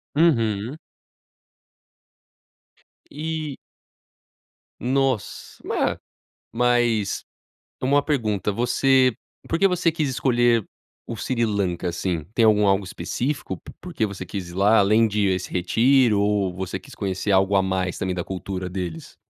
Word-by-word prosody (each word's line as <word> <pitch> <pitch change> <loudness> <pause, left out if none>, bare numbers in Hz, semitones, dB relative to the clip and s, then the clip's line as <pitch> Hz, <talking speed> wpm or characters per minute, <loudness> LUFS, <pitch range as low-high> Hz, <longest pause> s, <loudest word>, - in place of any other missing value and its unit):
Uhum. 120 -6 +2 2.3
E 155 -1 -4 1.2
Nossa 130 -2 -1
ma - - -1 0.5
mas 120 -3 +1 0.6
uma 140 +2 +3
pergunta 110 - 0
você 125 +2 +3 0.3
por 165 - 0
que 195 - +5
você 180 -2 +1
quis 155 -3 -1
escolher 120 -3 +2 0.4
o 115 - -6
Sri 120 +2 -1
Lanka, 95 -5 -1
assim? 85 -2 -2
Tem 115 - +3
algum 105 -1 +5
algo 95 0 +2
específico? 95 - -3 0.2
Por 180 0 -9
que 110 - 0
você 100 -2 -7
quis 90 -1 -6
ir - - -10
lá 105 +4 +4
além 110 +3 +4
de 105 -1 +1
esse 95 -1 -1
retiro 115 +4 +3
ou 100 -3 +1
você 95 0 -4
quis - - -14
conhecer 95 +1 -2
algo 95 +1 +3
a 95 - +4
mais 95 -1 -1
também 95 -1 -2
da 90 - -2
cultura 95 -1 -5
deles? 90 -4 -6
105 Hz, 130 wpm, -23 LUFS, 95-130 Hz, 2.3 s, que